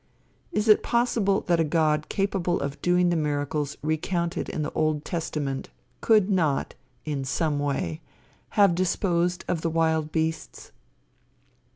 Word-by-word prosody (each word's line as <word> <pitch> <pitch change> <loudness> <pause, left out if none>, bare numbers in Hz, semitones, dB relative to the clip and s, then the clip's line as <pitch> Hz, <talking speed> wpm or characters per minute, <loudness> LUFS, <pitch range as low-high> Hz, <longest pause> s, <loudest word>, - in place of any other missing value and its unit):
Is 210 +1 -1
it 215 - +6
possible 235 -5 +1
that 170 -2 +1
a - - +4
God 155 -1 +1
capable 195 -3 0
of 140 0 -4
doing 180 0 +3
the 175 - +1
miracles 145 -1 -1
recounted 170 +3 -1
in 155 - -3
the 150 - -4
Old 155 -1 0
Testament 150 -5 -3 0.3
could 215 -4 +4
not, 165 -9 0 0.3
in 145 -3 -2
some 145 +2 -1
way, 135 - -2 0.6
have 200 -4 +6
disposed 175 0 0
of 165 - -1
the 165 - 0
wild 160 -1 +1
beasts? 160 0 -3
165 Hz, 140 wpm, -26 LUFS, 150-180 Hz, 0.6 s, it